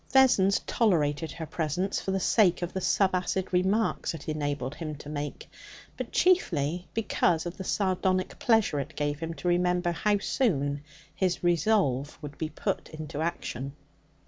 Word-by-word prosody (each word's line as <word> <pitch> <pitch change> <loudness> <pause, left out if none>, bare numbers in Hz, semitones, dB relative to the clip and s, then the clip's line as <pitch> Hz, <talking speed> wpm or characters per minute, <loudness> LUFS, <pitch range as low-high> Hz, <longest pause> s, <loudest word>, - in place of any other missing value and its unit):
Vessons 225 -8 +5
tolerated 160 -8 +1
her 165 - -5
presence 170 +5 -1
for - - -5
the 190 0 +1
sake 185 -3 +3
of 175 - -4
the 190 - -1
subacid 190 0 +1
remarks 190 0 +1
it 145 - -10
enabled 145 -3 -2
him 155 -1 -5
to 145 - -11
make, 145 -1 -5 0.5
but - - -5
chiefly 175 - +2
because 180 -7 +1
of 175 +1 -5
the 190 - -5
sardonic 185 -1 0
pleasure 220 -10 +3
it 145 +4 -5
gave 145 -1 -1
him 165 0 -4
to 180 - -5
remember 175 0 +2
how 205 +4 +1
soon 145 - 0 0.3
his 185 -2 -1
resolve 170 - +2
would 145 -2 -8
be 155 - -2
put - - -3
into 155 -1 -6
action. 135 -5 -3
175 Hz, 155 wpm, -28 LUFS, 150-190 Hz, 0.5 s, Vessons